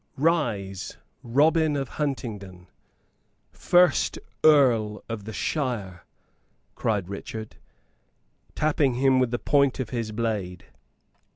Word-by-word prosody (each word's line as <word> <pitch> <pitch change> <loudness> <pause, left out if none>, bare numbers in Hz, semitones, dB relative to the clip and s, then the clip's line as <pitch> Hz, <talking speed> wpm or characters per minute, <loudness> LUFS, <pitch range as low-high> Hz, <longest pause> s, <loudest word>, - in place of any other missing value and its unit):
"Rise, 115 - -1 0.2
Robin 150 +5 +2
of 135 -2 -2
Huntingdon, 105 -11 -5 0.9
first 180 0 +3 0.3
Earl 120 -9 +4
of 115 -3 -6
the 110 - -6
shire!" 110 - -3 0.7
cried 105 -5 -1
Richard, 110 +2 -7 1.0
tapping 145 -4 +1
him 130 0 +3
with 130 -2 +2
the 120 - -1
point 140 0 +2
of 125 -4 -4
his 115 -3 -3
blade. 105 -6 -3
120 Hz, 100 wpm, -25 LUFS, 105-140 Hz, 1.0 s, Earl